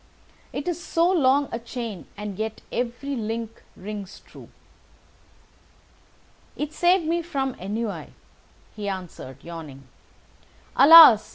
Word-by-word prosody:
"It 280 - -5
is 345 -1 -3
so 335 +2 +1
long 285 -4 +3
a 230 - -3
chain, 230 -5 -7
and 205 -1 -6
yet 220 0 -4
every 245 +4 -3
link 225 0 -5
rings 200 0 -8
true." - - -15 2.1
"It 300 +1 -4
saved 355 -1 +2
me 335 +2 0
from 275 -6 -3
ennui," 210 +3 -4 0.7
he 205 -2 -4
answered, 170 -8 -8
yawning. 155 -5 -9 0.9
"Alas! 280 -8 +9
230 Hz, 110 wpm, -24 LUFS, 205-295 Hz, 2.1 s, Alas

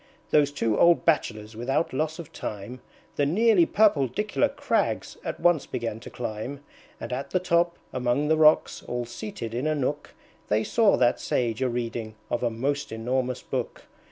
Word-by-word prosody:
Those 145 -2 +4
two 115 -6 0
old 170 0 +5
Bachelors 110 -9 0
without 135 +8 -1
loss 155 +3 -1
of 165 -2 -9
time 105 +5 -6 0.4
The 145 - +3
nearly 200 +1 +4
purpledicular 205 - +2
crags - - -1
at - - -4
once 175 -4 +3
began 115 -2 -4
to - - -10
climb; 120 +4 -5 0.4
And - - -5
at 135 +2 -4
the 185 - +1
top, 170 -1 +1 0.2
among 125 +3 0
the 160 - +4
rocks, 155 0 +4
all 120 0 -2
seated 120 - -6
in 125 +6 -1
a 155 - +1
nook, 140 -4 -3 0.3
They 110 +1 +2
saw 220 - +3
that 120 -1 +3
Sage 115 -1 -1
a 130 - +2
reading 115 -2 -4 0.2
of 120 - 0
a 120 - +1
most 140 +5 -2
enormous 125 +3 -2
book. - - -4
130 Hz, 170 wpm, -26 LUFS, 120-160 Hz, 0.4 s, old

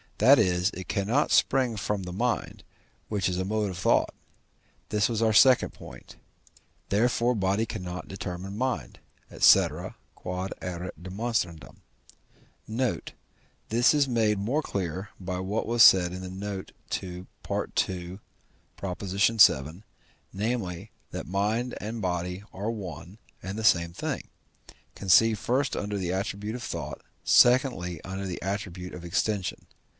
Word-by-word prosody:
that 130 +7 +7
is, 90 -1 +2
it 95 +1 -8
cannot 110 +9 +1
spring 130 -3 +3
from 105 -1 -2
the 90 - -6
mind, 120 +6 -2 0.4
which 100 -4 -1
is 90 - -2
a 95 - -1
mode 105 0 -1
of 90 - -7
thought. 95 - +2 0.8
This 105 +2 +2
was 115 -1 -1
our 110 -1 +3
second 130 +3 +5
point. - - -12 0.7
Therefore 120 +3 +2
body 100 0 +1
cannot 90 -4 -6
determine 95 0 -6
mind, 110 - -3 0.4
&c. - - +8
Q.E.D. 90 -1 -6 1.8
Note. 120 +3 -2 0.6
This 120 +5 +4
is 145 -2 +3
made 110 -4 +2
more 120 +10 0
clear 95 - -4
by 90 -1 -4
what 100 +4 -2
was 120 0 +1
said 90 -4 +7
in 95 - -6
the 95 - -6
note 95 +1 -6 0.2
to 90 -1 -4 0.2
II. 90 0 -2 0.6
vii., 95 -4 +3 0.5
namely, 100 -2 -3 0.2
that - - -6
mind 105 +7 -1
and 110 +2 -5
body 90 +1 -2
are 105 +4 -3
one 95 -2 -8 0.2
and 95 +2 -5
the 110 - -4
same 85 -5 +3
thing, - - -4 0.7
conceived 110 +3 +4
first 130 +2 0
under 105 0 -3
the 90 -2 -2
attribute 100 +3 -3
of 125 - -6
thought, - - -5 0.2
secondly, 120 - +4
under 95 +1 -5
the 90 -2 -5
attribute 95 -2 -4
of 90 - -8
extension. 95 +2 -1
100 Hz, 130 wpm, -27 LUFS, 90-110 Hz, 1.8 s, c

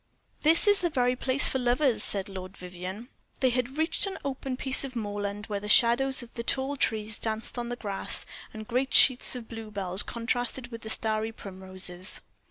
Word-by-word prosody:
"This 325 +7 +6
is 410 -1 +5
the 350 - +1
very 250 -4 +1
place 260 +2 +5
for 265 - +3
lovers," 250 0 +1
said 200 0 +1
Lord 190 -1 -9
Vivianne. 185 +6 -8 0.3
They 260 -2 +2
had 250 +3 -2
reached 320 +5 +2
an 385 - -5
open 265 -1 -4
piece 265 +1 +2
of 265 -2 -6
moorland, 205 -1 -4
where 205 -2 -4
the 210 +1 -6
shadows 245 +4 +4
of 235 - -15
the 235 - -5
tall 265 +4 0
trees 215 -4 -1
danced 220 +2 -3
on 240 0 -4
the 245 - -3
grass, 200 -5 -2 0.3
and 215 -1 -9
great 255 +3 -1
sheets 255 -1 +5
of 240 -3 -8
bluebells 205 -4 -4
contrasted 245 +1 -2
with 230 -1 -6
starry 220 0 0
primroses. 185 -2 -5
235 Hz, 180 wpm, -27 LUFS, 205-260 Hz, 0.3 s, This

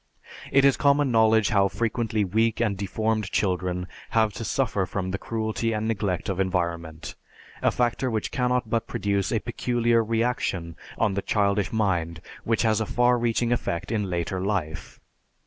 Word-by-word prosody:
It 135 0 +5
is 140 - +4
common 140 -1 +3
knowledge 110 -2 +4
how 100 -2 +3
frequently 110 0 -1
weak 110 +4 +1
and 110 -4 +1
deformed 110 +1 -1
children 90 -2 0 0.2
have 110 -2 +2
to 115 - -6
suffer 110 -6 0
from 95 -1 -3
the 95 - -3
cruelty 115 0 -2
and 110 0 -2
neglect 100 -5 -1
of 95 -1 -2
environment, 85 -4 -2 0.5
a - - +4
factor 125 +1 0
which 110 -3 -2
cannot 125 -2 0
but 115 +1 -1
produce 100 -1 -1
a 115 - +2
peculiar 120 0 +1
reaction 110 -7 -1 0.2
on 110 -3 +1
the 100 - -1
childish 100 -2 +1
mind 90 -7 0 0.2
which 115 +1 +1
has 110 -1 +2
a 110 - -2
far 125 0 +3
reaching 120 0 0
effect 95 -5 -2
in 105 -4 -1
later 90 +1 -2
life. 95 -6 -3
110 Hz, 165 wpm, -25 LUFS, 95-115 Hz, 0.5 s, It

